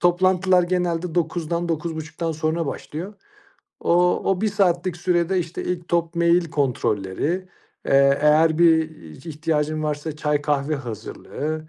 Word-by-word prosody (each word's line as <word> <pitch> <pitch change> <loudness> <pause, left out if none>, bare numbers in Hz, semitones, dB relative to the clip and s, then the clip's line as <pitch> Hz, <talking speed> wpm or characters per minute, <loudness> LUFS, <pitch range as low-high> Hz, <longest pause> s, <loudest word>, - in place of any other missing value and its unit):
Toplantılar 180 +1 +3
genelde, 175 -1 -1
09:00'dan, 170 0 -1
09:30'dan 160 0 -3
sonra 160 +1 -1
başlıyor. 170 +8 -6 0.7
O 180 +1 +2
o 185 -1 0
bir 215 - +2
saatlik 185 -3 +1
sürede, 175 +1 +1
işte, 170 -1 -4
ilk 180 -1 -4
top 170 0 0
mail 170 +1 +3
kontrolleri. 140 - -1 0.4
Eee, 140 0 +4
eğer 155 +1 +4
bir 160 -2 +5 0.4
ihtiyacın 155 -1 -1
varsa 150 0 -3
çay 150 -1 0
kahve 145 0 0
hazırlığı, 140 +6 -6
165 Hz, 125 wpm, -22 LUFS, 150-175 Hz, 0.7 s, bir